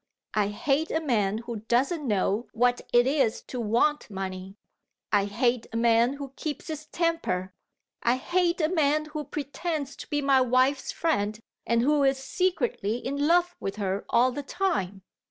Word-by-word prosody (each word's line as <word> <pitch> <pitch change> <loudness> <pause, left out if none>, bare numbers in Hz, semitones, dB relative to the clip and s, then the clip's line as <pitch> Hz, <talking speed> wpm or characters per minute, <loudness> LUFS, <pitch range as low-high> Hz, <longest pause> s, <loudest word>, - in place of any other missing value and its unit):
I 210 -2 +2
hate 275 +9 0
a 320 - 0
man 215 -9 +1
who 235 -1 -4
doesn't 260 - 0
know 210 +2 0
what 245 +1 +2
it 240 0 +5
is 265 -4 +1
to 250 - -6
want 235 +7 +1
money; 190 -1 -6 0.6
I 200 - +3
hate 235 +3 0
a 230 - -3
man 235 +2 +4
who 280 -1 -8
keeps 305 +1 -5
his 310 -1 -6
temper; 305 - -1 0.5
I 240 +1 +3
hate 350 +6 0
a 310 - +3
man 305 -3 +2
who 305 0 -5
pretends 290 +1 -4
to - - -9
be 295 -2 0
my 275 -2 +4
wife's 255 +2 +2
friend, 215 -10 -1 0.3
and 235 0 +2
who 295 +2 +3
is 270 0 +3
secretly 270 - -1
in 280 +4 -1
love 350 +1 +3
with 195 0 -4
her 200 -1 -2
all 250 +2 +4
the 285 - -4
time. 235 - -2
260 Hz, 170 wpm, -27 LUFS, 220-300 Hz, 0.6 s, it